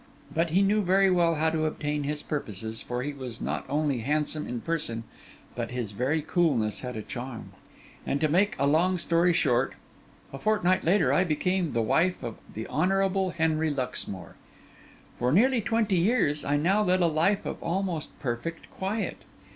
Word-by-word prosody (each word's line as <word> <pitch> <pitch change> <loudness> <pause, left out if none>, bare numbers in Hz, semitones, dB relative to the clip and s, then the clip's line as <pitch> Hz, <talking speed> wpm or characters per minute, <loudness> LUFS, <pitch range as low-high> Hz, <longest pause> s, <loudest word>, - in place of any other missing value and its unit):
But 165 +1 +1
he 185 +5 +3
knew 210 +2 +3
very 195 0 +4
well 170 -2 +3
how 160 +1 +1
to 155 -1 0
obtain 150 -1 -2
his 150 +1 -3
purposes, 110 -5 -4
for 125 0 -3
he 145 +1 -3
was 130 -4 -7
not - - -3
only 145 -2 0
handsome 150 +4 -1
in 125 - -3
person, 150 -9 -2 0.5
but - - -3
his 120 -4 -3
very 135 +9 0
coolness 140 - +1
had 125 -2 -6
a 110 - -4
charm; 125 0 -7 0.5
and 140 - -1
to 155 - +2
make 190 +7 +2
a 140 - +1
long 170 +6 +3
story 170 +1 +2
short, 125 -5 +2 0.6
a 135 - -6
fortnight 185 -1 +2
later 190 +5 +3
I 185 - +4
became 180 0 0
the 115 -1 +1
wife 175 +11 +1
of 115 - -5
the 110 +1 -5
Honourable 190 +3 +1
Henry 160 -2 +1
Luxmore. 125 - -4 0.9
For 125 +1 +1
nearly 240 - +4
twenty 215 -3 +1
years 170 -6 +2
I 145 +1 +1
now 190 +8 +2
led 185 -2 +2
a - - +4
life 170 +6 +2
of - - -5
almost 175 -2 -3
perfect 125 +7 -4
quiet. 200 +3 -3
160 Hz, 175 wpm, -27 LUFS, 135-185 Hz, 0.9 s, very